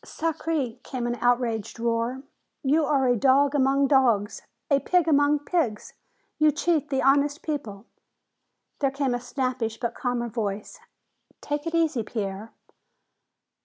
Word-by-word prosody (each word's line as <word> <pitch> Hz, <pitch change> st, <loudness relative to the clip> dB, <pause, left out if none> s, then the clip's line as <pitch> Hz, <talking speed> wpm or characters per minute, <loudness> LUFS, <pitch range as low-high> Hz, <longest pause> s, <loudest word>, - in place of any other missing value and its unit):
"Sacré!" 310 Hz, -6 st, -3 dB
came 250 Hz, -2 st, -5 dB
an 240 Hz, -, -1 dB
outraged 235 Hz, -3 st, 0 dB
roar. 235 Hz, +3 st, -1 dB, 0.4 s
"You 300 Hz, +3 st, +3 dB
are 275 Hz, -3 st, +2 dB
a 245 Hz, -, +3 dB
dog 275 Hz, +4 st, +3 dB
among 275 Hz, 0 st, +3 dB
dogs! 240 Hz, -7 st, +2 dB, 0.3 s
A 280 Hz, -, +5 dB
pig 355 Hz, +2 st, +1 dB
among 290 Hz, -1 st, +4 dB
pigs! 260 Hz, -13 st, -1 dB, 0.5 s
You 305 Hz, 0 st, +5 dB
cheat 305 Hz, -1 st, 0 dB
the 270 Hz, -1 st, 0 dB
honest 285 Hz, +3 st, +2 dB
people!" 230 Hz, -10 st, -5 dB, 0.9 s
There 275 Hz, -, +2 dB
came 275 Hz, -2 st, -1 dB
a 245 Hz, -, -1 dB
snappish 250 Hz, -3 st, -3 dB
but 235 Hz, -1 st, -2 dB
calmer 245 Hz, -1 st, -2 dB
voice. 215 Hz, -, -4 dB, 0.6 s
"Take 290 Hz, +2 st, -4 dB
it 330 Hz, -, -2 dB
easy, 320 Hz, -7 st, +1 dB
Pierre." 210 Hz, -1 st, -5 dB
265 Hz, 135 wpm, -25 LUFS, 235-290 Hz, 0.9 s, A